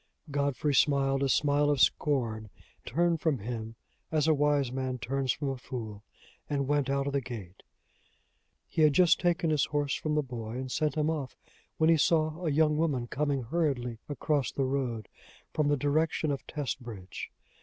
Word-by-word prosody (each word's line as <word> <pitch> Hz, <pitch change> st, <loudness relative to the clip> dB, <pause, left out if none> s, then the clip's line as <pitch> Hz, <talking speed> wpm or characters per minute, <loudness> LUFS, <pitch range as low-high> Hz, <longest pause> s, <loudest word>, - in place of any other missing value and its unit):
Godfrey 140 Hz, +1 st, 0 dB
smiled 135 Hz, -1 st, +3 dB
a 140 Hz, -, +1 dB
smile 145 Hz, +1 st, +3 dB
of 145 Hz, -2 st, +2 dB
scorn, 115 Hz, -9 st, +1 dB, 0.4 s
turned 170 Hz, -1 st, +1 dB
from 160 Hz, -5 st, +1 dB
him 115 Hz, 0 st, -5 dB, 0.4 s
as 155 Hz, -1 st, +2 dB
a 160 Hz, -, +5 dB
wise 145 Hz, -3 st, +2 dB
man 130 Hz, -1 st, -2 dB
turns 130 Hz, +2 st, -1 dB
from 140 Hz, +1 st, -2 dB
a 135 Hz, -, -3 dB
fool, 110 Hz, -5 st, -7 dB, 0.5 s
and 140 Hz, -2 st, 0 dB
went 145 Hz, -2 st, +1 dB
out 140 Hz, 0 st, +1 dB
of 140 Hz, -, -2 dB
the 140 Hz, -, +1 dB
gate. 105 Hz, -7 st, -8 dB, 1.1 s
He -, -, -1 dB
had 150 Hz, -2 st, +6 dB
just 175 Hz, +3 st, +5 dB
taken 175 Hz, -2 st, +1 dB
his 150 Hz, -3 st, +3 dB
horse 145 Hz, -1 st, -1 dB
from 155 Hz, -1 st, -1 dB
the 150 Hz, -, +2 dB
boy 115 Hz, -3 st, -6 dB
and 130 Hz, 0 st, -4 dB
sent 155 Hz, +3 st, 0 dB
him 155 Hz, 0 st, +1 dB
off, 145 Hz, -5 st, -4 dB, 0.4 s
when 160 Hz, +1 st, +4 dB
he 165 Hz, -, +5 dB
saw 155 Hz, +2 st, +2 dB
a 165 Hz, -, +1 dB
young 150 Hz, +1 st, +3 dB
woman 145 Hz, -7 st, 0 dB
coming 140 Hz, -2 st, 0 dB
hurriedly 125 Hz, -4 st, -1 dB
across 145 Hz, -3 st, 0 dB
the 135 Hz, -, -1 dB
road, 125 Hz, -5 st, -2 dB, 0.5 s
from 150 Hz, -2 st, +1 dB
the 145 Hz, 0 st, +2 dB
direction 150 Hz, +2 st, +1 dB
of 140 Hz, -, -4 dB
Testbridge. 120 Hz, -9 st, -5 dB
140 Hz, 175 wpm, -30 LUFS, 125-150 Hz, 1.1 s, had